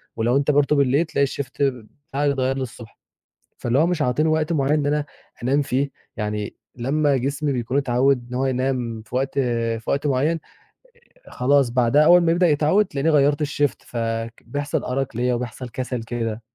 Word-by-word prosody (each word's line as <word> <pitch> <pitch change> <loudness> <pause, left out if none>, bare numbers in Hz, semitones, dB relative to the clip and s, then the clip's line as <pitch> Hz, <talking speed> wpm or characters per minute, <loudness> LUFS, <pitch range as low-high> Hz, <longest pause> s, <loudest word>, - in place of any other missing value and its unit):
ولو 120 +4 +2
أنت 140 +1 +2
برضه 145 +1 +3
بالليل 140 +3 +3
تلاقي 140 -3 +1
الShift 135 0 -5 0.6
بتاعك 140 +1 +1
اتغيّر 130 -1 0
لي 135 - -3
الصبح. 120 -3 -10 0.6
فاللي 120 +3 0
هو 165 - +4
مش 175 -3 -1
عاطيني 150 +4 +1
وقت 155 +1 +1
معيّن 140 -1 +1
إن 150 -2 +1
أنا 150 0 0 0.4
أنام 140 +4 +2
فيه، 140 +1 0 0.3
يعني 105 -1 -3 0.2
لمّا 140 +3 +1
جسمي 140 +3 -1
بيكون 125 +2 -1
اتعوِّد 130 -1 +2
إن - - -8
هو 130 +2 0
ينام 125 -3 -1
في 115 +3 -10
وقت 135 +1 0
في 115 -3 -1
وقت 140 +1 0
معيّن، 145 +5 +1 0.9
آآ - - -14
خلاص 135 0 +2
بعدها 125 +4 +3
أول 175 +3 +7
ما 165 -1 +3
يبدأ 175 +1 +3
يتعوِّد، 155 +7 +3
تلاقيني 145 +3 0
غيّرت 145 0 +3
الShift، 145 -1 -1
فك 115 -1 -4
بيحصل 145 0 -2
أرَق 130 -2 -2
ليّا 125 +1 +1
وبيحصل 125 +1 -5
كَسَل 125 0 -4
كده. 115 -1 -3
135 Hz, 180 wpm, -22 LUFS, 120-145 Hz, 0.9 s, أول